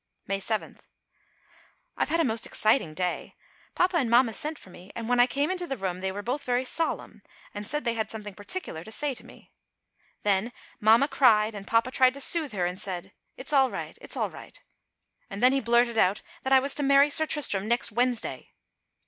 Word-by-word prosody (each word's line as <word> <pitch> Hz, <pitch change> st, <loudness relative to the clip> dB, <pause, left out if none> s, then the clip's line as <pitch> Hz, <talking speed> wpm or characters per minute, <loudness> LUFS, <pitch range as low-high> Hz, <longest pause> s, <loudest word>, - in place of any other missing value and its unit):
May 195 Hz, 0 st, -2 dB
7. 215 Hz, +2 st, -4 dB, 1.2 s
I've -, -, -1 dB
had 330 Hz, +2 st, +1 dB
a -, -, +4 dB
most 225 Hz, -4 st, -1 dB
exciting 215 Hz, -, +1 dB
day. 180 Hz, 0 st, -3 dB, 0.4 s
Papa 360 Hz, 0 st, +2 dB
and 255 Hz, -7 st, 0 dB
mamma 235 Hz, -1 st, +4 dB
sent 305 Hz, +6 st, -3 dB
for 185 Hz, -, -13 dB
me 180 Hz, +2 st, -14 dB
and 230 Hz, -1 st, -5 dB
when 245 Hz, 0 st, +1 dB
I 245 Hz, -, +6 dB
came 285 Hz, +5 st, -1 dB
into 360 Hz, -2 st, -3 dB
the 270 Hz, -, -4 dB
room 185 Hz, -2 st, -3 dB
they 190 Hz, 0 st, -2 dB
were 205 Hz, +2 st, -6 dB
both 255 Hz, +6 st, -3 dB
very 250 Hz, +1 st, 0 dB
solemn 325 Hz, +5 st, -2 dB, 0.3 s
and 205 Hz, 0 st, -7 dB
said 295 Hz, +4 st, -3 dB
they 235 Hz, -, 0 dB
had 220 Hz, -1 st, -3 dB
something 210 Hz, -2 st, -8 dB
particular 205 Hz, -, -5 dB
to 220 Hz, -, -10 dB
say 290 Hz, +4 st, 0 dB
to -, -, -9 dB
me. -, -, -17 dB, 0.7 s
Then 205 Hz, +4 st, +1 dB, 0.3 s
mamma 225 Hz, +6 st, +5 dB
cried 225 Hz, -6 st, +3 dB
and 200 Hz, -1 st, -9 dB
papa 230 Hz, +2 st, +2 dB
tried 255 Hz, 0 st, +3 dB
to 280 Hz, -, -5 dB
soothe 305 Hz, -3 st, +4 dB
her 180 Hz, -3 st, -1 dB
and 180 Hz, +3 st, -4 dB
said: 185 Hz, -4 st, -6 dB, 0.2 s
"It's 265 Hz, +3 st, -3 dB
all 265 Hz, -2 st, +4 dB
right, -, -, -6 dB
it's -, -, -3 dB
all -, -, -1 dB
right," -, -, -12 dB, 0.7 s
and 200 Hz, +3 st, -6 dB
then 250 Hz, -, +7 dB
he 275 Hz, -, +2 dB
blurted 235 Hz, 0 st, +2 dB
out 190 Hz, +2 st, +2 dB, 0.2 s
that 265 Hz, -, -4 dB
I 265 Hz, -, +8 dB
was 275 Hz, +1 st, 0 dB
to -, -, 0 dB
marry 280 Hz, +1 st, +4 dB
Sir 315 Hz, 0 st, +4 dB
Tristram 215 Hz, -11 st, 0 dB
next 235 Hz, 0 st, 0 dB
Wednesday. 245 Hz, +1 st, -1 dB
235 Hz, 210 wpm, -27 LUFS, 205-275 Hz, 1.2 s, I